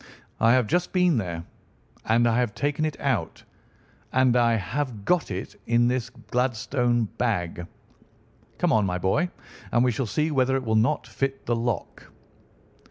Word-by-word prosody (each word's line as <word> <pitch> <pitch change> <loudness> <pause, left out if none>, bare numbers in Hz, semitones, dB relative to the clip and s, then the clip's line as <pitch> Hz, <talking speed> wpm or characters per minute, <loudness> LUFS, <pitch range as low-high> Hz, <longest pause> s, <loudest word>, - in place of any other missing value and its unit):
"I 115 +1 +5
have 125 -2 +3
just 175 +9 0
been 180 -5 +3
there, 85 -5 -3 0.6
and 115 +2 +3
I 115 +1 +2
have 120 -4 -1
taken 145 +2 0
it 155 - -4
out, 120 -13 -1 0.7
and 130 -1 +3
I 120 -1 +4
have 115 0 -3
got 180 -2 +2
it 95 -1 -6
in 120 +1 +3
this 125 -2 -1
Gladstone 125 -1 0 0.2
bag. 90 -7 -1 0.9
Come - - +2
on, 110 - +4
my 90 -2 -1
boy, 95 - +1 0.4
and 120 - +3
we 125 - +3
shall 120 +1 -2
see 155 +8 0
whether 135 -2 +2
it 135 - -1
will 110 - 0
not 120 +7 +2
fit 135 0 -3
the 120 - +1
lock." 115 -4 -4
120 Hz, 165 wpm, -25 LUFS, 110-135 Hz, 0.9 s, I